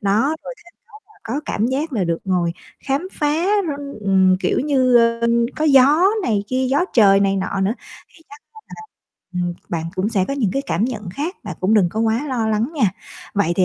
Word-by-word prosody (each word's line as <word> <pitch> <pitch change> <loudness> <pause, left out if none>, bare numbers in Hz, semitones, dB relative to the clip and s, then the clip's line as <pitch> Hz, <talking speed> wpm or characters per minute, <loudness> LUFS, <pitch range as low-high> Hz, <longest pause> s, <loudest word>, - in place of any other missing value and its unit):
Đó, 220 +10 +1
rồi 260 - -7
thêm 345 - -18 0.3
đó 430 - -24
là - - -24
có 255 +6 -3
cảm 215 - -1
giác 280 +5 -2
là 210 -7 0
được 170 -1 -1
ngồi 180 -3 0 0.3
khám 280 +7 -1
phá 300 - -2 0.4
r - - -3 0.4
ừm, 190 -1 +4
kiểu - - 0
như, 260 -4 +3
ờ, 230 0 +3 0.4
có 310 - -1
gió 285 +4 +5 0.2
này 210 - 0
kia, 260 0 0
gió 285 +6 +2
trời 200 -4 +5
này 195 0 +2
nọ 195 0 -2
nữa, 195 +4 +1 0.3
thì 320 - -22
chắc 425 +1 -14
á 440 - -14
là - - -10 0.5
ừm, 175 -1 -2
bạn 165 -2 -3
cũng 190 +3 -1
sẽ 200 -5 +1
có 275 - -1
những 240 -9 0
cái 275 - -1
cảm 205 -6 -1
nhận 215 -7 -5
khác, 305 - -4
bạn 180 -5 -6
cũng 190 +4 +2
đừng 195 -5 +4
có 220 - -3
quá 225 +5 0
lo 235 -4 -1
lắng 220 +5 0
nha. 220 -11 +2 0.4
Vậy 200 -5 +1
thì 185 - +4
225 Hz, 225 wpm, -20 LUFS, 195-275 Hz, 0.5 s, gió